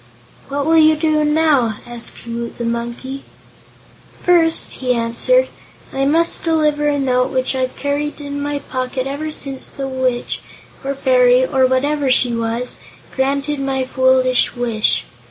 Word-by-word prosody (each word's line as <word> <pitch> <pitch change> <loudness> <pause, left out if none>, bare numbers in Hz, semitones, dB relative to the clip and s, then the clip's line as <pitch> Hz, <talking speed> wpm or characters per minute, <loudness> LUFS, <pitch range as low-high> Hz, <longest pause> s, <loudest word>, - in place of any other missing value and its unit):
"What 280 0 -2
will 325 +1 +5
you 310 0 +6
do 310 -1 +1
now?" 300 -7 +2
asked 240 -1 -5
Woot 235 0 -5
the 235 - -4
Monkey. 235 +3 -4 1.0
"First," 335 -2 +3
he 250 -1 +1
answered, 235 - +2 0.5
"I 270 0 0
must 330 +4 +1
deliver 300 -3 +1
a 290 -1 +1
note 255 -2 +1
which 260 0 -1
I've 255 -1 -2
carried 290 +1 -2
in 285 0 -5
my 290 0 -2
pocket 255 -1 -3
ever 285 +3 -3
since 275 -3 -4
the 270 -1 -5
witch, 260 -2 -2 0.4
or 275 +1 -2
fairy, - - +4
or 265 - +2
whatever 280 +2 +1
she 250 -1 +3
was, 230 +2 -2 0.4
granted 280 +2 0
my 270 -1 -1
foolish 260 -1 +2
wish. 235 -3 0
275 Hz, 145 wpm, -18 LUFS, 255-300 Hz, 1.0 s, you